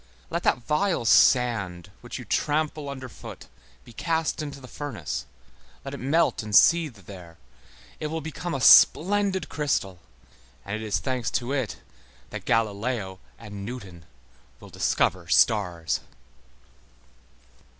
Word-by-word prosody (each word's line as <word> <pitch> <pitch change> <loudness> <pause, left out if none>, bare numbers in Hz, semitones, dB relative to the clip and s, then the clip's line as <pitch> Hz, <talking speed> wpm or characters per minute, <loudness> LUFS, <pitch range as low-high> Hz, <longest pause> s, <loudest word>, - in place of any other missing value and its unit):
Let - - -1
that 120 - +1
vile 160 -3 0
sand 110 -9 +3
which - - -7
you - - -9
trample 150 -1 -1
under 130 -2 -6
foot 120 - -11 0.4
be 120 - -14
cast 160 +3 -1
into 145 -2 -6
the 130 - -12
furnace, 125 - -5 0.6
let 135 - -6
it 140 - -6
melt 150 +6 +1
and 105 -2 -3
seethe 145 - +4
there, 90 -4 -12 0.6
it 155 - -3
will 160 +2 -3
become 160 +2 -5
a 135 - -3
splendid 195 - +5
crystal, 115 - -2 0.7
and 100 - -3
it 110 - -5
is 110 -2 -1
thanks 130 -5 -2
to 125 +3 -4
it 130 -9 -3 0.5
that - - -7
Galileo 105 -2 -1 0.2
and 105 -3 -9
Newton 100 -7 -8 0.5
will - - -13
discover 90 -1 0
stars. 90 -7 +2
125 Hz, 130 wpm, -25 LUFS, 100-150 Hz, 0.7 s, splendid